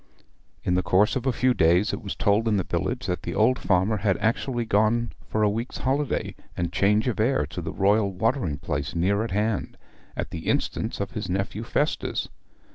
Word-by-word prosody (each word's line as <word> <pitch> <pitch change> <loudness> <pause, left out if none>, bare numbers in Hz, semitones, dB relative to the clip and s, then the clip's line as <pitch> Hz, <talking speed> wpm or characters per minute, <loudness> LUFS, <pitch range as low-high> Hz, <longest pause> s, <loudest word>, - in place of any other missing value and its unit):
In 90 - +1
the 90 - +3
course 95 +3 +3
of 130 0 -2
a - - +4
few 125 +1 +2
days 90 +3 +3
it - - -4
was 100 -3 -5
told 105 +3 +2
in 105 -2 +2
the 95 - 0
village 120 +10 -2
that 90 -3 -2
the - - -5
old 120 +5 +3
farmer 95 +3 +2
had 100 -1 +1
actually 120 +2 0
gone 110 +3 +2 0.2
for 110 - 0
a - - +5
week's 115 +4 -3
holiday 140 +1 -1 0.2
and 85 0 -2
change 105 +4 +3
of 120 - -1
air 130 +5 +2
to - - -6
the - - -4
Royal 100 +1 +2
watering 95 - 0
place 75 0 -3
near 100 +5 +2
at 115 - -3
hand, 105 +1 -1 0.4
at - - -3
the 80 -1 -6
instance - - -1
of - - -3
his - - -5
nephew 95 +3 -2
Festus. 145 +6 -1
105 Hz, 200 wpm, -25 LUFS, 95-115 Hz, 0.4 s, a